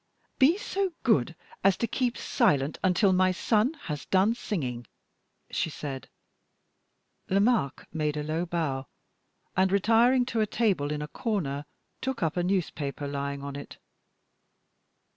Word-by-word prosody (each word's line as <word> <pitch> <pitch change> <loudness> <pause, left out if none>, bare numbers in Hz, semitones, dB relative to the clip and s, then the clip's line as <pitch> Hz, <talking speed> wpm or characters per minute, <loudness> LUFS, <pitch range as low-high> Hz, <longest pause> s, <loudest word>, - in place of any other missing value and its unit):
"Be 295 +7 +6
so 390 -3 -2
good 165 - +2 0.3
as 195 -1 +4
to - - 0
keep 245 +2 -1
silent 145 - +1
until 190 +1 +4
my 185 0 +4
son 220 - +1
has 150 -2 -5
done 195 +4 +3
singing," 130 - -4 0.6
she - - 0
said. 140 -3 -6 1.2
Lomaque 200 - +2
made 150 -2 -1
a 150 - -2
low 160 +4 -2
bow, 145 -6 -2 0.7
and 190 0 +3
retiring 230 +5 +4
to 230 -2 -1
a 215 - +2
table 195 -11 +1
in 150 0 -2
a - - -5
corner, 150 - -2 0.4
took 260 -6 -2
up 160 -1 0
a 175 - +1
newspaper 160 -6 -1
lying 140 0 -3
on 140 0 -5
it. 145 - -8
180 Hz, 140 wpm, -28 LUFS, 145-225 Hz, 1.2 s, Be